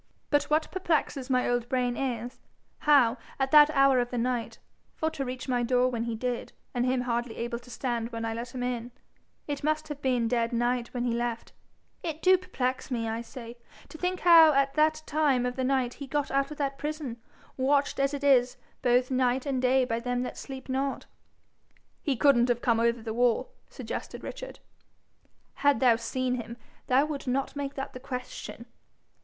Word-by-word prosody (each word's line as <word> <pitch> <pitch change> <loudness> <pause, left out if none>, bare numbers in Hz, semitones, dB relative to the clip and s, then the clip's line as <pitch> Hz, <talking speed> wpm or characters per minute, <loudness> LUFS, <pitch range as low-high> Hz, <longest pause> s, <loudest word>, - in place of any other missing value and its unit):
But 290 -1 +3
what 310 +1 0
perplexes 310 -7 -1
my 255 -1 +2
old 245 -1 0
brain 250 -2 0
is, 245 -2 -3 0.4
how, 270 -5 +4 0.2
at 270 0 0
that 300 -1 +8
hour 275 -3 +4
of 245 0 0
the 245 - -4
night, 240 0 -1 0.4
for 315 0 -1
to 275 - -3
reach 255 0 -5
my 250 -2 +1
door 250 +1 +2
when 235 -2 -2
he 235 -1 -2
did, 245 +1 -3 0.2
and 245 0 0
him 255 0 +1
hardly 240 -1 -2
able 235 0 -3
to 250 - -17
stand 235 -1 -2
when 230 -1 -4
I 225 - -2
let 235 +2 -6
him 250 - -3
in, 245 -1 -3 0.6
it 290 -1 -4
must 310 +1 0
have 295 -1 -6
been 250 -4 +1
dead 235 0 0
night 240 0 0
when 245 -1 -3
he 240 -1 0
left 235 0 -3 0.5
it 320 -2 -4
do 375 0 +7
perplex 265 -9 -3
me, 230 -3 -2
I 225 +1 -2
say, 235 0 -10 0.3
to - - -10
think 365 0 -1
how 330 -3 +8
at 275 0 +2
that 310 +1 +2
time 290 -5 +2
of 250 0 -2
the 260 - -2
night 255 -2 +1
he 280 - -8
got 290 +1 -1
out 275 0 +1
of 300 - -8
that 275 -1 -2
prison, 295 -6 -4 0.3
watched 280 +2 +1
as 275 0 +2
it 285 - -6
is 255 -3 +4 0.2
both 250 +1 +2
night 255 0 +1
and 270 -3 -1
day 255 0 +3
by 230 -1 -1
them 245 +1 -1
that - - -5
sleep 265 -1 -8
not.' 270 +1 -2 1.0
'He 280 - 0
couldn't 250 -3 +4
have 240 0 0
come 230 -2 +3
over 235 0 +1
the 220 -1 -4
wall?' 245 - +1 0.2
suggested - - -6
Richard. - - -8 1.0
'Had 285 0 +3
thou 245 -3 +5
seen 250 +2 -2
him 235 +1 -9 0.3
thou 265 +3 +4
would 295 -3 -5
not 270 +3 -1
make 280 -1 -4
that 270 - -5
the 255 - -7
question.' 250 -1 -7
255 Hz, 195 wpm, -28 LUFS, 240-280 Hz, 1.0 s, that